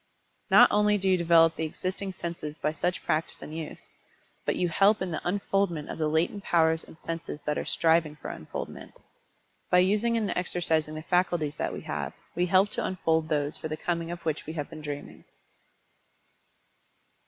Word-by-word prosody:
No - - +9
only 210 0 +4
do 195 -1 -2
you 190 - +5
develop 165 -2 +5
the - - -3
existing 185 +4 -3
senses 170 -4 -5
by 150 - 0
such 175 +3 -2
practice 155 +1 -1
and 155 - -8
use, 160 -2 -7 0.6
but - - +2
you 180 - +1
help 200 +5 +4
in 185 -1 -3
the 160 - -3
unfoldment 190 -4 0
of - - -7
the 155 - +1
latent 165 +6 0
powers 160 -1 +3
and - - -15
senses 165 -2 -5
that 150 - 0
are - - -2
striving 160 -2 +2
for 150 - -7
unfoldment. - - -7 0.8
By 180 - +5
using 210 +6 +3
and 215 -3 0
exercising 160 -3 0
the 155 - -6
faculties 175 -4 +1
that - - -1
we - - -6
have, - - -4 0.2
we 180 +1 +1
help 190 +3 +4
to - - -2
unfold 160 -4 0
those 150 -1 +1
for - - -5
the 155 0 -4
coming 170 0 -2
of 170 0 -7
which 155 -2 -2
we 160 - -4
have 150 -3 -5
been 155 - -8
dreaming. 145 -1 -7
165 Hz, 185 wpm, -28 LUFS, 155-185 Hz, 0.8 s, No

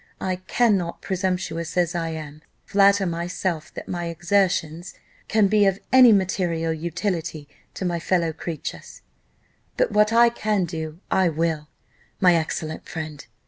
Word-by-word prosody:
I 185 -1 -2
cannot, 185 -2 0
presumptuous 180 -3 -2
as 175 -1 +2
I 165 -1 -2
am, 155 -2 -7 0.2
flatter 200 0 +4
myself 170 -1 -3
that - - -7
my 175 -1 -3
exertions 175 -1 0 0.3
can 215 -1 +3
be 205 0 +4
of 195 -1 +1 0.2
any 255 -2 +9
material 175 -4 +1
utility 165 -2 -3 0.3
to 190 - -4
my 175 -1 -1
fellow 170 -1 0
creatures, 165 0 -7 0.7
but - - +2
what 210 +1 +3
I 235 +1 +6
can 215 -5 0
do 160 -1 -6
I 185 -2 +3
will, 160 -1 -1 0.5
my 180 -2 +5
excellent 160 -1 -3
friend! 155 -3 -6
175 Hz, 140 wpm, -23 LUFS, 160-195 Hz, 0.7 s, any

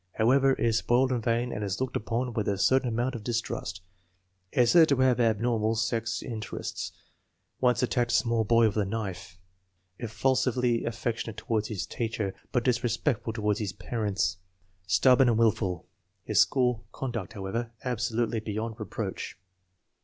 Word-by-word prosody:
However, 135 +4 +4
is 115 -2 +1
spoiled 130 +2 +2
and 120 -3 -1
vain 120 +1 0
and 105 - -4
is 100 -1 -2
looked 130 -1 -2
upon 120 +3 -2
with 105 -2 -1
a 100 - 0
certain 130 +5 +3
amount 120 +3 -1
of 115 -4 -6
distrust. 115 -5 -3 0.7
Is 120 -2 +4
said 165 -2 +7
to 140 - +4
have 130 -1 +3
abnormal 115 -1 +1
sex 115 0 -1
inter 110 -4 -5
ests. - - -4 0.7
Once 125 0 +2
attacked 120 -1 +1
a - - +3
small 115 -1 +2
boy 115 +1 +4
with 110 -1 0
a 105 - +2
knife. 95 -3 -5 0.6
Effu 120 +3 0
sively 125 -2 +1
affectionate 115 -1 -3
toward 110 -2 -1
his 100 -5 -3
teacher, 110 -4 -3 0.2
but 125 - +1
disrespect 120 0 0
ful 115 - -2
toward 105 -2 0
his 100 -3 -3
parents. 100 0 -1 0.5
Stubborn 125 +8 +5
and 115 - +2
willful. 100 -6 +1 0.4
His 105 -1 +3
school 125 0 +2
conduct, 120 -8 -4
however, 115 +4 -4
absolutely 120 -1 -1
beyond 110 +1 -4
reproach. 105 -4 -5
115 Hz, 160 wpm, -28 LUFS, 105-125 Hz, 0.7 s, said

